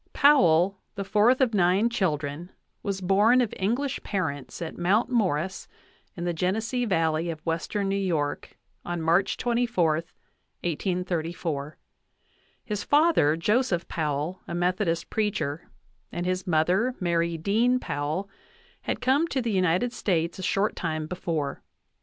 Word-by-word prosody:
Powell, 190 - +4 0.2
the 200 - -3
fourth 215 +6 +3
of 245 -3 +3
nine 190 +3 +3
children, 160 -7 -2 0.3
was 195 -1 -3
born 205 +7 +4
of 240 -4 0
English 245 +8 -1
parents 160 -9 -3
at 165 - -5
Mount 205 +8 +1
Morris, 190 -6 0 0.5
in 175 - -4
the 175 0 -1
Genesee 220 +9 -1
Valley 165 -4 +1
of 160 -2 -4
western 170 +5 -1
New 195 - 0
York, 165 -7 -2 0.3
on 175 0 -3
March 170 +4 +2
24, 235 -9 +1 0.7
1834. 170 -4 -2 0.9
His 210 -2 -3
father, 290 - +4
Joseph 200 -1 +1
Powell, 155 +2 -2
a 170 - -4
Methodist 175 -1 0
preacher, 185 -8 -2 0.4
and 175 - -3
his 185 +1 -2
mother, 180 +10 +2
Mary 170 -1 0
Dean 225 +9 +2
Powell, 150 - -3 0.5
had - - -3
come 270 +6 +3
to 270 - -1
the 235 -3 -1
United 185 +5 +1
States 170 -5 -1
a - - -4
short 195 +3 0
time 155 -2 -2
before. 160 -5 -3
185 Hz, 135 wpm, -26 LUFS, 165-215 Hz, 0.9 s, Powell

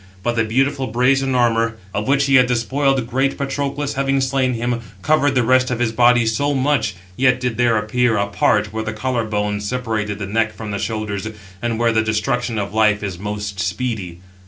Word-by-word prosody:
But 120 +1 0
the 115 - +2
beautiful 135 +4 0
brazen 130 +3 +2
armour, 115 -2 +2 0.2
of 105 +3 -2
which 140 +1 +3
he 140 - +1
had 130 -2 +6
despoiled 130 +2 +1
great 135 +3 0
Patroclus, 140 +1 -2
having 135 0 0
slain 130 -1 +1
him, 120 +1 -1 0.2
covered 145 -2 +2
the 125 - +3
rest 130 +2 +3
of 125 - -1
his 120 -1 0
body 120 0 +4
so 140 +6 0
much; 130 -7 +1 0.2
yet 125 +1 +3
did 125 -2 -2
there 120 -2 +3
appear 115 +2 +1
[a 100 - +1
part] 105 +1 +1
where 110 0 -2
the 110 0 -4
collar 120 +1 -1
bones 105 -1 -2
separate 110 -5 -2
the 100 - -4
neck 110 +2 -1
from 110 -2 -6
the 100 - -3
shoulders, 110 -2 -3 0.3
and 120 -1 -1
where 115 0 +2
the 110 0 +2
destruction 115 +2 -1
of 100 0 -3
life 105 -1 +2
is 95 -4 -4
most 105 -1 -5
speedy. 105 -7 -3
120 Hz, 200 wpm, -19 LUFS, 110-130 Hz, 0.3 s, had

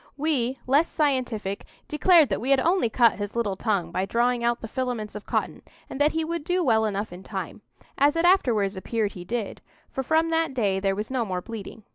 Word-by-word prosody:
We, 270 -4 0
less 285 +6 +3
scientific, 250 -9 -1 0.2
declared 310 -1 +5
that 200 - -1
we 255 - -3
had 275 -1 +5
only 340 -4 +2
cut 230 -1 +3
his 205 +1 -5
little 215 -5 0
tongue 190 -5 -1
by 185 +2 -1
drawing 240 +2 +1
out 235 0 +1
the 225 - -7
filaments 245 -3 -3
of 210 - -9
cotton, - - -2 0.3
and 270 - -4
that 295 +1 +3
he 320 0 -1
would 335 -1 -3
do 360 +3 0
well 220 -6 +3
enough 205 -2 -3
in 180 - -9
time,—as 210 - -3
it 330 +1 +1
afterwards 230 - +3
appeared 210 +2 -2
he 180 - -9
did, 225 +3 -4 0.3
for 265 - -2
from 320 +4 +1
that 325 -4 0
day 200 -6 +1
there 195 0 0
was 210 +4 -4
no 255 -3 0
more 185 -4 -3
bleeding. 220 -1 -8
235 Hz, 210 wpm, -25 LUFS, 205-290 Hz, 0.3 s, declared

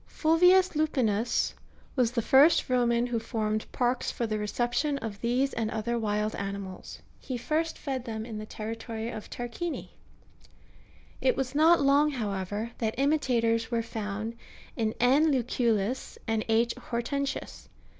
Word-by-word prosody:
(52.) - - -23
Fulvius 360 +4 +5
Lupinus 245 -8 +1 0.4
was 245 -3 +2
the 235 -3 0
first 275 +2 +5
Roman 240 -1 +3
who 240 -2 -1
formed 215 -2 -2
parks^^ 250 0 0
for 235 - -2
the 215 -1 -2
reception 240 +7 0
of 215 -5 -6
these 250 +4 +1
and 225 -2 -1
other 225 +2 -2
wild 210 0 -1
animals: 195 -1 -6 0.2
he 255 - -4
first 310 +7 -1
fed 265 -4 -3
them 220 -2 -4
in 220 -3 -6
the 215 - -7
territory 225 +1 -5
of 215 - -8
Tarquinii: 245 +8 -5 1.3
it - - +2
was 260 -1 -2
not 320 +3 +5
long, 285 +2 +4
however, 210 -3 -3
that 220 -2 -1
imitators 240 -6 +1
were 230 -1 0
found 220 0 -4 0.4
in 220 -2 -1
L. 255 +5 +5
Lucullus 245 -5 0
and 225 -1 -1
Q. 225 +1 +4
Hortensius. 275 +4 -3
235 Hz, 145 wpm, -28 LUFS, 220-270 Hz, 1.3 s, Fulvius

